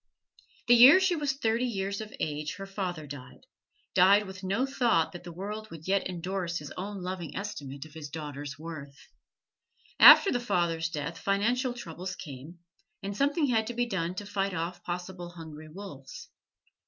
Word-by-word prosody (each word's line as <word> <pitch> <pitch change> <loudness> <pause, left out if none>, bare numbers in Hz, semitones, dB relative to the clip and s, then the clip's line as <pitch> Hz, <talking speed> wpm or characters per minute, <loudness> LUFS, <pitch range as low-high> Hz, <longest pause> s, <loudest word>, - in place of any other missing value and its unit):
The 240 - +7
year 255 +9 +9
she 375 -2 +2
was 290 -3 0
thirty 235 -2 0
years 200 -2 -3
of 215 0 -8
age 150 0 -3
her 195 - -7
father 185 -5 -4
died 145 -3 -10 0.5
died 200 +3 +6
with 190 0 -9
no 200 +8 +1
thought 240 -11 +2
that 175 - -9
the 175 - -8
world 210 +5 -6
would 160 -2 -10
yet 195 0 +1
endorse 180 -1 -3
his 150 -2 -7
own 195 0 -6
loving 180 -2 -5
estimate 145 -9 -6
of 155 - -15
his 155 -2 -8
daughter's 145 -2 -6
worth. 150 -3 -8 1.0
After 395 - +10
the 245 - +1
father's 170 -8 0
death 165 +1 -4
financial 240 +6 +1
troubles 185 -3 -6
came, 145 +1 -9 0.5
and 200 +1 -4
something 285 - +2
had 225 -5 +1
to 240 - -5
be 245 0 +1
done 185 -6 -2
to 205 - -5
fight 195 -2 -2
off 170 +1 -4
possible 175 0 -5
hungry 155 -2 -10
wolves. 160 -6 -10
185 Hz, 170 wpm, -29 LUFS, 160-215 Hz, 1.0 s, After